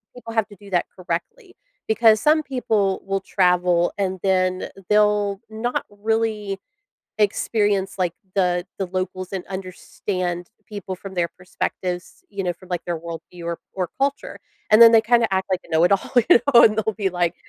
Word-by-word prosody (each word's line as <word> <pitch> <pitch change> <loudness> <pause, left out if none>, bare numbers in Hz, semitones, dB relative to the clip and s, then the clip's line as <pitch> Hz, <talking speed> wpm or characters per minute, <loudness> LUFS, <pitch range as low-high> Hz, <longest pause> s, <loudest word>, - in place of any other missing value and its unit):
people 240 -2 -9
have 220 -2 +1
to 205 - -13
do 200 +2 -15
that 180 -2 +1
correctly 360 - -5 0.3
because 220 -1 +4
some 310 +1 +4
people 220 -8 0
will 195 0 -1
travel 180 -2 +2
and 190 -2 -1
then 185 -1 +1 0.2
they'll 210 -1 +2
not 225 +3 -2
really 210 -1 -1 0.6
experience, 205 -1 +1
like, 180 -2 0 0.2
the 180 -2 +1
the 195 - -1
locals 185 0 -4
and 190 -2 -4
understand 185 -1 -4 0.2
people 200 -3 -6
from 190 +1 -9
their 175 -2 0
perspectives- 180 0 -5
you 200 -1 -4
know, 180 - -1
from, 185 +2 -17
like, 175 -2 -2
their 175 - -1
world 165 0 -7
view 175 -1 -9
or 170 0 -3 0.2
or 185 -3 -2
culture- 280 +1 -2 0.3
and 215 +2 +6
then 230 0 +10
they 225 - +7
kinda 235 0 +3
act 190 0 -1
like 185 -1 +1
a - - -18
know 160 +1 +3
it 180 - +4
all, 195 - 0
you 240 0 +6
know, 235 - +10
and 215 - +4
they'll 220 0 0
be 195 -2 -1
like 175 -1 0
195 Hz, 180 wpm, -22 LUFS, 180-215 Hz, 0.6 s, then